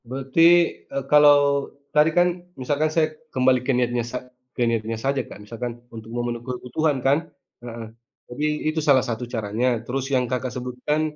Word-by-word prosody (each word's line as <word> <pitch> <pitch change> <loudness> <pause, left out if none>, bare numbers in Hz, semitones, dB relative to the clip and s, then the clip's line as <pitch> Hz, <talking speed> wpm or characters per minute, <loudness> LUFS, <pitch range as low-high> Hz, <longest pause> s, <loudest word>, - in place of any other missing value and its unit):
Berarti, 135 +4 -1 0.5
eee, 140 0 -3
kalau 150 -1 +8 0.6
tadi 150 +1 +5
kan 175 0 +6 0.3
misalkan 145 +4 0
saya 160 -2 +4 0.3
kembalikan 130 0 +2
niatnya 120 -1 +1
sa 125 - -2 0.4
ke - - -4
niatnya 115 -1 -1
saja 135 0 +1
kan, - - -11
misalkan 120 +3 -5 0.2
untuk 110 0 -9
memenuhi 120 -1 -3
kebutuhan 130 +4 -1
kan. 140 +2 +5 0.4
Heeh. 115 -1 -7 0.4
Jadi 125 +5 -3 0.2
itu 155 +1 0
salah 135 -3 +5
satu 115 -1 -3
caranya. 110 +2 -1 0.2
Terus 130 +3 -2
yang 130 -1 +3
kakak 130 0 -2
sebutkan, 125 +4 -2
125 Hz, 155 wpm, -23 LUFS, 120-140 Hz, 0.6 s, kalau